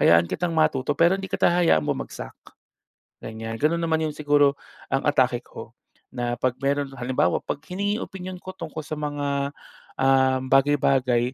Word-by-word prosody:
Hayaan 85 0 +5
kitang 175 +1 -1
matuto, 150 -3 +1
pero 170 +4 +4
hindi 195 - -5
kita - - +3
hayaan 170 - +3
bumagsak, - - -4 0.9
ganyan. 110 0 -6
Ganun 155 +5 +1
naman 160 -1 +1
yung 155 - -2
siguro, 145 -1 +3 0.4
ang - - +2
atake - - +2
ko. - - -11 0.4
Na 120 -1 -2
'pag 130 0 0
meron 140 0 0
halimbawa, 120 -9 +1
'pag 140 - -4
hiningi 200 +3 -2
opinyon 185 -1 -7
ko 185 - -6
tungkol 155 -4 -7
sa - - -6
mga, 140 -1 -2 0.5
ah, 130 0 +4
bagay-bagay. 130 -2 +2
140 Hz, 155 wpm, -24 LUFS, 130-160 Hz, 0.9 s, Hayaan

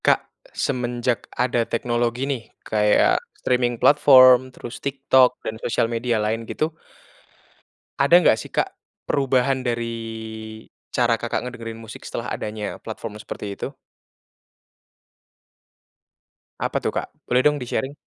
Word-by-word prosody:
Kak, - - +3 0.4
semenjak 120 -4 -1
ada 125 -1 +1
teknologi 120 +1 0
nih 135 -4 -2 0.2
kayak 105 -1 +3 0.2
streaming 125 -1 0
platform 130 -1 +7
terus 125 -1 -9
TikTok 135 -2 +3
dan 110 +1 -5
sosial 115 - +1
media 115 0 -1
lain 110 +2 -1
gitu, 155 +1 -1 1.3
ada 140 +5 +5
enggak 175 -10 +5
sih, - - -7
Kak, - - -1 0.4
perubahan 135 -1 +2
dari 115 -1 -1 1.0
cara 120 -2 +2
kakak 120 - -2
ngedengerin 115 -2 -7
musik 110 0 -10
setelah - - -5
adanya 105 -1 -4
platform 110 -1 -7
seperti 105 - -7
itu? - - -5 2.8
Apa - - -1
tuh, - - 0
Kak? - - -3 0.2
Boleh 125 +1 +3
dong 150 0 +4
di-sharing. 130 +2 -2
120 Hz, 120 wpm, -23 LUFS, 115-130 Hz, 2.8 s, platform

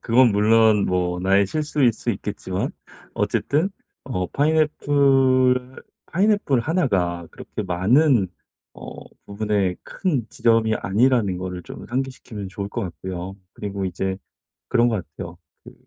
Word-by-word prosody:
그건 120 0 +4
물론 110 0 +4
뭐 90 -1 0
나의 95 +1 +3
실수일 145 -2 +1
수 120 +2 -3
있겠지만 95 -2 -3 0.4
어쨌든 160 +7 0 0.3
어 90 -9 -2
파인애플 135 -4 +2 0.2
파인애플 195 - +2
1 160 +5 +1
가 85 -4 -1
그렇게 - - -7
많은 110 - +3 0.4
어 - - -10 0.2
부분에 100 -3 -1
큰 145 - -2
지점이 115 -1 +2
아니라는 105 -1 +2
거를 90 -1 -5
좀 - - -10
상기시키면 125 -5 -4
좋을 100 0 -5
것 - - -4
같고요. 95 +1 -6 0.2
그리고 100 -2 -5
이제 95 +1 -2 0.5
그런 120 0 +3
것 115 - +1 0.2
같아요. 85 -2 -7 0.3
그 - - -13
110 Hz, 270 characters per minute, -22 LUFS, 95-130 Hz, 0.5 s, 그건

